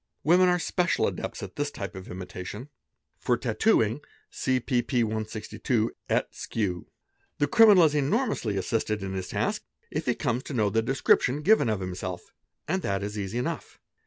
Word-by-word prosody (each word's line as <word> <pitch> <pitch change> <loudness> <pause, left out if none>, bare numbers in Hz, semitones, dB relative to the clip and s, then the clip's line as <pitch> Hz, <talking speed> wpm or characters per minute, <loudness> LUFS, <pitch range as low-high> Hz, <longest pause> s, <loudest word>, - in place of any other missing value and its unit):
Women 180 +3 +5
are 180 - +3
special 175 0 +1
adepts - - -4
at - - -9
this 145 0 0
kind 100 -9 -6
of 95 -1 -9
imitation. 95 +7 -7 0.5
(For 120 - +1
tattooing, 115 - +2 0.3
see 130 -1 0
pp. 120 0 +1
162 110 +1 -2 0.2
et - - +1
seqq.) 90 -6 -3 0.5
'The 145 - +2
criminal 210 0 +7
is 155 -2 +4
enormously 145 - 0
assisted 105 +1 -1
in 95 0 -4
his 95 -1 -4
task - - -1 0.3
if - - -3
he - - +2
comes 120 +1 -1
to 140 - -5
'know 105 -3 +2
the 115 +2 +2
description 135 +3 +2
given 210 - +4
of 105 -3 -1
himself, 90 -1 -5 0.3
and 190 +4 0
that 100 - -1
is 105 +1 -4
easy 100 +2 -3
enough. 125 - -4
115 Hz, 165 wpm, -27 LUFS, 100-145 Hz, 0.5 s, criminal